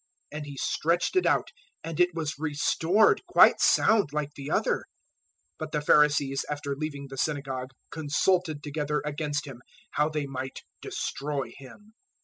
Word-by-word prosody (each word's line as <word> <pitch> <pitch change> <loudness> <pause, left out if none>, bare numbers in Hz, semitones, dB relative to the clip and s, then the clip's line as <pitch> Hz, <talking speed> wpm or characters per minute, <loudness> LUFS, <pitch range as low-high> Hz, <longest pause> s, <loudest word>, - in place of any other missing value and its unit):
And 150 0 -6
he 140 -1 -8
stretched 170 - 0
it 370 - +3
out, - - +1 0.3
and 165 -2 -5
it 180 -1 +3
was 155 -3 -3
restored 160 +6 +2
quite 360 - +6
sound 210 -9 +4
like 150 -1 -3
the 140 0 -7
other. - - +2
012:014 - - -14 0.8
But - - -5
the 150 - 0
Pharisees 145 -2 +3
after 145 -1 -3
leaving 145 -1 -5
the 135 -1 -8
synagogue 135 -4 -2 0.2
consulted 155 +1 0
together 150 0 -2
against 145 -1 -2
Him, 130 -4 -10 0.3
how 150 +1 +1
they 150 -2 -2
might 135 -1 -6 0.2
destroy 140 -4 -3
Him. 205 +11 -14
150 Hz, 150 wpm, -27 LUFS, 140-160 Hz, 0.8 s, quite